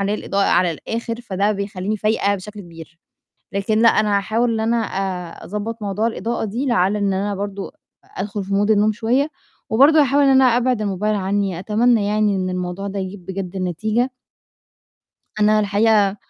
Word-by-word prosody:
الإضاءة 200 -1 -1
على 180 -2 +3
الآخِر، 230 +7 -5
فده 200 -1 0
بيخلّيني 200 +1 -3
فايقة 205 -1 +1
بشكل 210 +2 -9
كبير، 170 -1 -13 0.5
لكن 200 +2 0
لأ، 230 - +7
أنا 210 -2 +3
هاحاول 230 +4 0
إن 220 - -1
أنا 230 +2 +1
آآ 185 -3 -4
أضبّط 210 +3 -5
موضوع 205 +2 -1
الإضاءة 230 +2 -3
دي 235 +7 -3
لعل 200 -3 +2
إن 200 -1 0
أنا 200 +2 -1
برضه 200 0 -5 0.3
أدخل 200 0 -5
في 195 - -10
Mood 205 +2 +2
النوم 215 0 +3
شوية، 245 +7 0 0.4
وبرضه 290 +7 +6
هاحاول 280 +1 +3
إن 275 - +4
أنا 265 0 +5
أبعِد 250 -2 0
الموبايل 210 +1 -1
عنّي، 195 -2 -1
أتمنّى 215 +2 +2
يعني 210 -1 +1
إن 185 0 -2
الموضوع 180 +2 -4
ده 200 0 -5
يجيب 190 -1 -7
بجد 190 -1 -5
نتيجة. 215 +8 -1 1.3
أنا 215 0 +4
الحقيقة 205 -1 +2
205 Hz, 165 wpm, -20 LUFS, 195-225 Hz, 1.3 s, لأ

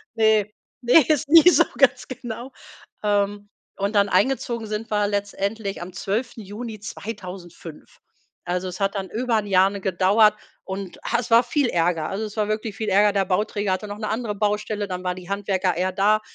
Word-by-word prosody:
Ne, 220 -2 +3 0.3
ne, 250 +4 +6
ist 300 -4 +2
nie 330 +2 +9
so, - - +5
ganz - - +3
genau. 245 0 -7 0.5
Ähm, 205 0 0 0.3
und 200 +2 -2
dann 200 0 +4
eingezogen 235 -2 0
sind 215 +2 -4
wir 210 -1 +2
letztendlich 200 0 -3
am 175 +1 -8
12.6.2005. 205 - -6 0.5
Also, 180 +1 -2
es 180 +2 -7
hat 195 +1 0
dann 190 -2 -4
über 235 +2 -1
'n 210 - -1
Jahr, 190 0 +4
ne, 200 -1 -7
gedauert 195 +4 +4 0.3
und, 190 -1 -6
ha, - - +1
es 240 - -5
war 230 +2 +7
viel 260 +1 0
Ärger. 165 -2 0
Also, 210 +3 -3
es 210 0 -9
war 210 -1 +1
wirklich 215 -1 -3
viel 220 +1 -3
Ärger. 205 +1 +4
Der 195 -1 +1
Bauträger 205 +1 0
hatte 210 +3 -4
noch 205 +1 -6
'ne 215 - -3
andere 220 -1 -2
Baustelle, 210 0 -1
dann 180 -1 -5
waren 180 0 -2
die 180 0 -11
Handwerker 195 -2 -1
eher 185 +1 0
da, 210 +2 +3
205 Hz, 185 wpm, -23 LUFS, 190-220 Hz, 0.5 s, nie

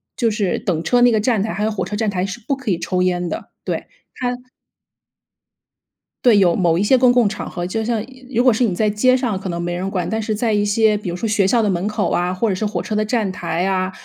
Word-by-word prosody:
就 230 -4 +1
是 205 -4 0
等 165 -4 -1
车 245 +9 +2
那 245 0 +6
个 220 - +2
站 215 -2 +1
台， 220 - -3
还 200 +4 -2
有 220 - 0
火 210 - -2
车 210 - -5
站 220 -2 0
台 185 -2 -1
是 195 +4 -6
不 275 - +1
可 260 -7 -3
以 170 - 0
抽 180 +1 -1
烟 180 -1 0
的。 - - -6 0.2
对， - - -3 0.3
它 250 -1 -2 1.9
对， 230 -4 +6
有 180 -4 +4
某 170 -3 +2
一 195 - +1
些 260 +6 +4
公 250 -1 +5
共 245 -3 +4
场 210 +1 -5
合， 175 -1 -4
就 220 +5 -2
像 225 -2 -1 0.3
如 245 -1 +1
果 255 - +5
是 225 - +1
你 205 -7 +1
在 215 +3 +1
街 255 +5 +3
上 235 -7 -2
可 190 -1 -5
能 170 0 -3
没 175 0 -2
人 185 +2 -3
管。 180 -3 -2
但 220 0 -1
是 215 0 -2
在 225 +1 0
一 205 0 +2
些 215 +1 +3
比 195 -4 -5
如 170 - -3
说 200 +6 -3
学 205 -3 +2
校 235 +2 +3
的 210 - +1
门 185 +2 -1
口 210 -1 -1
啊， 180 +1 0
或 225 +5 0
者 200 - +1
是 185 - -3
火 210 - -2
车 215 - -3
的 215 - +2
站 215 -3 0
台 170 -2 -3
呀， 185 -1 0
210 Hz, 295 characters per minute, -19 LUFS, 185-225 Hz, 1.9 s, 那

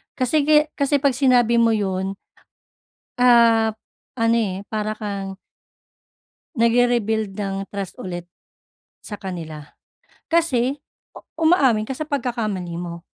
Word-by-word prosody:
Kasi 280 +3 +1
ki 300 0 +4
kasi 280 0 0
'pag 280 -1 +3
sinabi 245 -2 +3
mo 230 -1 +4
'yon 190 -1 -2 1.0
ah, 230 -2 +5 0.5
ano, 230 0 +3
eh, 195 -4 -1
para 215 -1 -2
kang 195 -2 -5 1.2
nag-re-rebuild 230 -3 +1
ng 195 -1 -4
trust 200 -2 -6
ulit, 175 -2 -5 0.8
sa 210 - -8
kanila. 165 -6 -7 0.6
Kasi, 280 -6 +1 0.6
umaamin 270 -10 +3
ka 265 - -4
sa 310 - -3
pagkakamali 225 - -3
mo. 170 0 -7
225 Hz, 110 wpm, -21 LUFS, 195-250 Hz, 1.2 s, ah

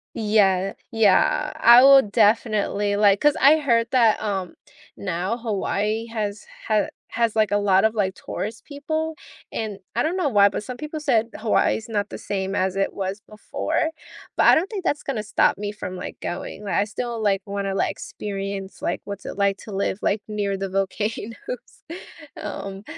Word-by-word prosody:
Yeah. 195 -3 +2 0.2
Yeah, 230 +8 +3
I 240 +2 +8
will 275 0 +9
definitely, 210 -1 +1
like 205 -1 +4
'cause 295 -1 +4
I 295 +3 +7
heard 235 -5 +2
that, 230 -4 +4
um, 195 -4 -3 0.4
now 190 +4 -2
Hawaii 215 0 -2
has 215 -2 -4 0.2
ha 215 -1 +2 0.2
has, 230 -1 0
like, 215 -2 +3
a 205 - +3
lot 195 0 +3
of, 220 +1 +1
like, 190 -3 0
tourist 220 +2 -6
people, 315 +2 -3 0.4
and 210 -3 -4 0.2
I 240 - +2
don't 340 +4 -1
know 355 - +1
why, 205 -6 +5
but 200 - -4
some 250 +3 -6
people 305 +3 -5
said 235 -6 +1
Hawaii 220 0 +2
is 225 - -9
not 205 -2 -2
the - - -7
same 195 -1 -3
as 190 -1 0
it 195 0 0
was 195 +1 -4
before, 215 +8 -3 0.4
but - - +3
I - - +8
don't 355 +5 +1
think 405 -4 -5
that's 295 -4 -1
gonna 230 -6 -3
stop 205 - +2
me 205 0 -3
from, 185 -3 -7
like, - - -7
going, 200 +4 -6
like, - - -3
I 200 - +3
still, 235 +3 -4
like, 200 -2 +1
wanna, 200 -1 -3
like, - - 0
experience, 195 -1 -6
like, - - -2
what's 200 -1 -7
it - - -6
like 200 -1 +2
to 215 - -10
live, 195 0 -1
like, 205 +1 0
near 205 -2 -2
the 195 - -3
volcanoes. 205 +3 -2 1.0
Um, 195 0 -6
210 Hz, 185 wpm, -23 LUFS, 200-235 Hz, 1.0 s, will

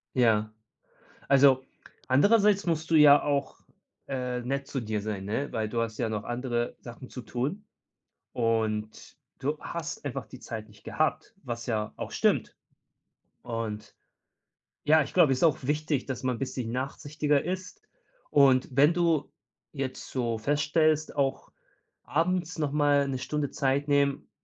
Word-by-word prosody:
Ja. 110 -4 +2 0.8
Also, 135 -1 +5 0.4
andererseits 200 - +4
musst 160 -1 -1
du 165 - +5
ja 145 -1 +8
auch, 140 -2 -1 0.5
äh, 125 -2 -2
nett 135 +3 -3
zu 135 - -3
dir 110 -2 -2
sein, 100 -2 -4
ne? 115 +8 -3
Weil 110 -1 -1
du 115 +1 -2
hast 115 -1 -2
ja 120 - 0
noch 105 -2 -3
andere 120 -1 -2
Sachen 120 +1 -10
zu 125 - -8
tun 140 - -3 0.7
und 110 -2 -2 0.2
du 145 +3 -2
hast 165 -2 -6
einfach 135 -1 -4
die 130 - -12
Zeit 110 -3 -7
nicht 105 0 -20
gehabt, 155 0 -1
was 120 -2 -5
ja 110 -3 -2
auch - - -5
stimmt. - - +1 0.9
Und 110 -3 -5 0.9
ja, 155 +1 +5
ich - - -10
glaube, 165 -7 +5
es 130 - +1
ist - - -1
auch 155 -4 +4
wichtig, 150 0 -1
dass 130 -1 -4
man 125 -1 0
'n - - -10
bisschen 125 -3 -3
nachsichtiger 145 +2 -1
ist. 185 +2 -5 0.5
Und, 135 -3 +5
wenn 145 +5 +5
du 165 -4 +1 0.4
jetzt 135 -3 -5
so 120 -3 -1
feststellst, 150 +4 +1
auch 135 -2 -1 0.5
abends 175 +2 -1
nochmal 145 -1 +2
'ne 135 -1 -2
Stunde 145 +2 -2
Zeit 140 +2 0
nehmen, 140 -1 +1
135 Hz, 150 wpm, -28 LUFS, 120-150 Hz, 0.9 s, ja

